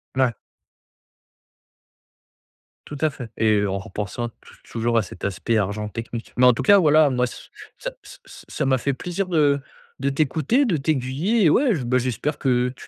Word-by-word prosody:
La 130 -3 +2 2.5
Tout 145 - -7
à 155 - +3
fait 125 -5 -9
et 110 -2 +3
en 100 -1 -1
repensant, 105 +4 -5
tou - - -17
toujours, 115 0 -1
à - - +4
cet 90 - -12
aspect 100 +4 -1
argent 105 +1 -2
technique. 115 +1 -7
Mais, 125 - +5
en 125 - +7
tout - - -3
cas, 205 - +7
voilà, 155 -3 +5
moi 125 -1 +1
ç - - -11 0.3
ça - - -5
ç - - -13
ça 150 - -6
m'a 130 -1 +3
fait 140 +2 -1
plaisir 180 +8 -3
de 150 -5 +3 0.4
de 140 +1 0
t'écouter, 155 - +1
de 190 -10 +1
t'aiguiller, 150 - 0
et 160 - +6
ouais 245 - +3
j 135 - -3
ben 125 +2 +1
j'espère 130 +4 -2
que 125 -1 +1
tu - - -13
130 Hz, 180 wpm, -23 LUFS, 115-155 Hz, 2.5 s, en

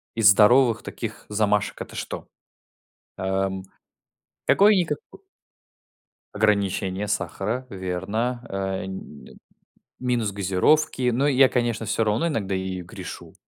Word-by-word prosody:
из 110 -3 +6
здоровых 115 +4 +5
таких - - -6
замашек 105 -1 0
это - - -8
что? - - -6 0.9
Э, - - -5
м, 95 0 -1 0.9
какое-никако 200 -4 +4 1.4
ограничение 100 -2 +1
сахара, 110 +5 -2
верно. 100 +6 -2
Э 95 -1 -2
и - - -6
нь 95 -6 -10 0.6
минус 120 -5 0
газировки. 105 +8 +2
Но 130 +4 +1
я, 135 -1 +6
конечно 120 -3 -1
всё 110 +2 +1
равно 110 +10 +1
иногда 105 - -2
ею 95 -1 -3
грешу - - -9
105 Hz, 110 wpm, -24 LUFS, 95-120 Hz, 1.4 s, из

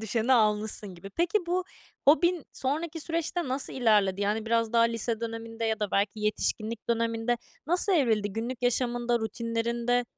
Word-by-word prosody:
düşeni 225 +3 +1
almışsın 210 -3 +1
gibi. 180 +3 -10
Peki, 340 - +1
bu 360 +1 0 0.4
hobin 345 +1 +4
sonraki 315 +5 -2
süreçte 335 0 -2
nasıl 265 +2 -2
ilerledi? 210 -6 +3
Yani, 215 +2 0
biraz 230 -1 +1
daha 230 -1 +5
lise 230 -1 0
döneminde 230 0 -5
ya 220 -1 0
da 210 - -1
belki 205 +2 0
yetişkinlik 215 +1 -1
döneminde 230 +1 +1 0.3
nasıl 355 +5 +2
evrildi? 220 - +2
Günlük 235 +3 -4
yaşamında, 240 -1 +1
rutinlerinde 235 +2 -1
230 Hz, 145 wpm, -28 LUFS, 220-260 Hz, 0.4 s, daha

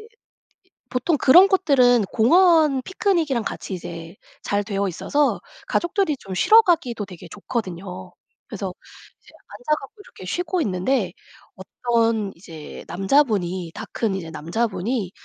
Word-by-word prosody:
이 435 - -14 0.8
보통 260 +6 0
그런 345 +9 +7
곳들은 265 - +3
공원 315 +2 +4
피크닉이랑 330 - 0
같이 200 - -6
이제 165 -1 -8 0.3
잘 205 0 0
되어 200 -1 -2
있어서 285 - 0 0.3
가족들이 345 -2 0
좀 195 -6 -9
쉬러 440 - +6
가기도 285 - 0
되게 180 -2 -12
좋거든요. 185 -3 -6 0.4
그래서 195 -3 -5 0.5
이제 - - -20 0.2
앉아 245 +9 -2
갖고 410 +10 -13
이렇게 185 - -13
쉬고 350 - -2
있는데 185 - -1 0.7
어떤 230 -4 +1
이제 165 -3 -11
남자분이 190 - 0
다 - - -6
큰 215 -4 -1
이제 165 -4 -6
남자분이 195 - -2
225 Hz, 290 characters per minute, -22 LUFS, 185-295 Hz, 0.8 s, 그런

